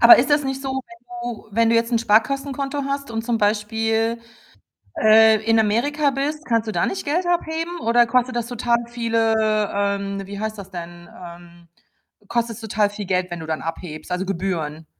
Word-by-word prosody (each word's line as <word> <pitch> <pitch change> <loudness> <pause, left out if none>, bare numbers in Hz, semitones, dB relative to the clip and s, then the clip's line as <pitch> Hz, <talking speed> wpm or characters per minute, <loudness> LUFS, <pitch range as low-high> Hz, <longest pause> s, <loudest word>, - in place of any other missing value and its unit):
Aber 235 - +10
ist 270 +4 +1
das 290 0 +3
nicht 270 0 -3
so, 270 - -3
wenn 235 -3 -20 0.5
du - - -21
wenn 230 +1 +3
du - - +3
jetzt 230 +1 +1
'n 230 - +3
Sparkassenkonto 275 +5 0
hast 280 -1 -3
und 225 0 -3
zum 235 -1 0
Beispiel, 225 +2 0 0.8
äh, 220 0 +6
in 225 0 +4
Amerika 280 +8 +2
bist, 295 +3 -3
kannst 230 -2 0
du - - -1
da 175 -4 +1
nicht 380 - -3
Geld 335 +5 0
abheben 340 0 -1
oder 240 +1 +4
kostet 250 +1 +1
das 235 -1 -2
total 240 -1 +1
viele, 230 -2 +1 0.4
ähm, 200 0 -1
wie 200 +1 -7
heißt 215 0 -3
das 195 -1 -10
denn, 175 -1 -9 0.2
ähm 170 0 -13 0.6
kostet's 235 -1 -2
total 210 -1 +1
viel 205 0 -7
Geld, 185 -1 0
wenn 175 - -4
du - - -7
dann 160 -1 -2
abhebst, 165 -1 -6
also 180 +1 -1
Gebühren? 165 -5 -3
225 Hz, 190 wpm, -22 LUFS, 200-250 Hz, 0.8 s, Aber